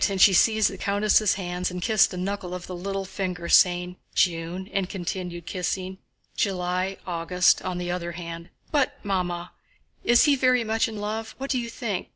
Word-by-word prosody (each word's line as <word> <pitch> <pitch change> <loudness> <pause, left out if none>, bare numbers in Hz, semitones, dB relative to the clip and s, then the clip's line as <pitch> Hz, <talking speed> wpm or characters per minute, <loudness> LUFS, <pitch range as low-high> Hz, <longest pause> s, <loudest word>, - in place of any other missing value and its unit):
and 195 -1 -2
she 195 +1 +7
seized 220 +2 +4
the - - -6
countess' 205 0 +3
hands 180 -1 -3
and 180 -1 -5
kissed 215 -1 +4
a 180 - -6
knuckle 185 -1 -3
of 180 - -7
the 185 - -7
little 195 +2 -3
finger, 180 -3 -4
saying, 180 0 +4 0.2
"June," 175 +1 0
and 190 -2 -1
continued, 175 -2 -5
kissing, 185 +1 -3 0.4
"July, 185 0 -1
August," 180 +1 +2
on 185 -1 -3
the 175 0 -3
other 175 -1 -3
hand. 170 0 -7 0.2
"But, 280 -4 +1
Mamma, 180 -3 -2 0.5
is 240 0 +5
he 290 -1 +5
very 255 -2 +3
much 225 0 +1
in 220 -1 -7
love? 220 +2 -4
What 275 +1 -4
do 255 - +1
you 235 -1 -4
think? 215 -5 -4
185 Hz, 185 wpm, -25 LUFS, 180-210 Hz, 0.5 s, she